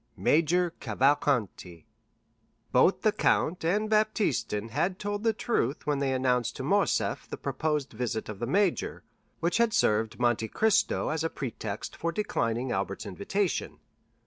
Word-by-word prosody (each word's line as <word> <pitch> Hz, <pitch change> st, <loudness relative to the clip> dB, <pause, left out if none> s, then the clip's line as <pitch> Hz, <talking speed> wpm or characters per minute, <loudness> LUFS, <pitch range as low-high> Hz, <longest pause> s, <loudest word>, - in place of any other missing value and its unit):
Major 170 Hz, +3 st, +2 dB
Cavalcanti 115 Hz, -, 0 dB, 0.9 s
Both -, -, +3 dB
the -, -, +4 dB
count 175 Hz, +2 st, +1 dB
and 205 Hz, +6 st, +1 dB
Baptistin 215 Hz, -, 0 dB
had 180 Hz, +10 st, -1 dB
told 205 Hz, 0 st, -3 dB
the 225 Hz, -, +4 dB
truth 205 Hz, -, -1 dB
when 145 Hz, -2 st, 0 dB
they 140 Hz, -1 st, 0 dB
announced 125 Hz, -3 st, +1 dB
to -, -, -5 dB
Morcerf -, -, +1 dB
the -, -, -5 dB
proposed 150 Hz, -3 st, -2 dB
visit 120 Hz, -3 st, -3 dB
of 105 Hz, -2 st, -7 dB
the 120 Hz, -, -2 dB
major, 195 Hz, -, 0 dB, 0.4 s
which 170 Hz, +5 st, +1 dB
had 235 Hz, -2 st, +2 dB
served 110 Hz, -, +1 dB
Monte 120 Hz, -2 st, +1 dB
Cristo 220 Hz, -, +1 dB
as 160 Hz, 0 st, -1 dB
a 165 Hz, -, 0 dB
pretext 110 Hz, -7 st, -5 dB
for 170 Hz, -, -2 dB
declining 130 Hz, -, -1 dB
Albert's 100 Hz, +2 st, -3 dB
invitation. 180 Hz, -, -2 dB
145 Hz, 145 wpm, -28 LUFS, 115-195 Hz, 0.9 s, the